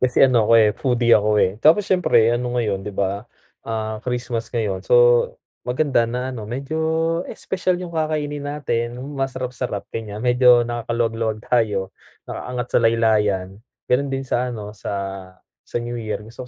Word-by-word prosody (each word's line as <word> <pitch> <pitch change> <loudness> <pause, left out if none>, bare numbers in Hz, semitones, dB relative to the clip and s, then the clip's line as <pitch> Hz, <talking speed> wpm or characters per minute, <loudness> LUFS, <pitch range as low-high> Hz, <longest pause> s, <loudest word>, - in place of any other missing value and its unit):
kasi 130 +1 +4
ano 120 -5 +3
ako, - - +4
eh, 110 -2 +5
foodie 120 0 +1
ako, 105 -1 +4
eh, 95 - +3
tapos 160 +9 +5
siyempre 175 - +3
ano 120 +1 -2
ngayon, 105 -5 0
'di 100 0 -8
ba, 100 +1 -2 0.3
ah, 110 -1 -4
Christmas 120 -1 -3
ngayon, 105 -6 -2
so 95 - +1 0.7
maganda 125 -3 +1
na 125 +2 -3
ano, 110 -4 -7
medyo 135 +6 -4 0.5
espesyal 185 -1 -2
yung 180 -1 -7
kakainin 155 -2 -2
natin, 120 -5 -2
yung 135 +4 -7
masarap-sarap, 125 -5 -3
gan'yan. 105 -1 -5
Medyo 125 -1 +5
nakakaluwag-luwag 115 -2 -2
tayo, 105 -6 0 0.3
nakaangat 125 0 -5
sa - - +5
laylayan. 110 -5 +2 0.4
Gano'n 140 +3 +2
din 135 0 -3
sa 125 0 -1
ano, 105 -4 -6
sa 105 - -6 0.7
sa - - -8
New 120 0 -3
Year, 110 -1 -4
gusto 120 +3 -10
120 Hz, 155 wpm, -21 LUFS, 110-130 Hz, 0.7 s, eh